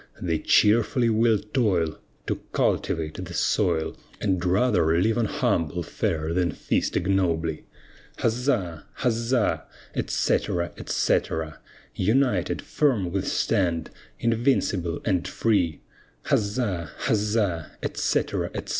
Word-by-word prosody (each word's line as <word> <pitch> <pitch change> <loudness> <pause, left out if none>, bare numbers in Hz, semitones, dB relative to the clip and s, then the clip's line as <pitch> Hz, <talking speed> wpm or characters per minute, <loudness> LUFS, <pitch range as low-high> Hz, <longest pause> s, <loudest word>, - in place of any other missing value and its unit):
They 85 -3 -1
cheerfully 115 +6 +3
will 110 0 +4
toil, 100 - 0 0.3
To - - -1 0.2
cultivate 80 +3 0
the 90 -1 -7
soil, 85 -6 +1 0.2
And 95 -4 0
rather 90 -4 +3
live 110 +5 +2
on 120 -2 +1
humble 90 - 0
fare 80 +1 -2
than 85 -3 +1
feast - - -1
ignobly. 85 -4 0 0.5
Huzza! 115 - 0 0.2
huzza! 115 -1 +1 0.3
etc., 85 0 0
etc. 80 -1 -1 0.3
United, 110 -2 +1
firm 115 - +1
we 95 +1 0
stand, 90 -5 0 0.3
invincible 115 -8 +1
and 95 -5 +1
free, 95 -9 +1 0.4
Huzza! 100 - 0
huzza! 105 -6 0
etc., - - 0
etc. - - -5
95 Hz, 100 wpm, -25 LUFS, 85-115 Hz, 0.5 s, will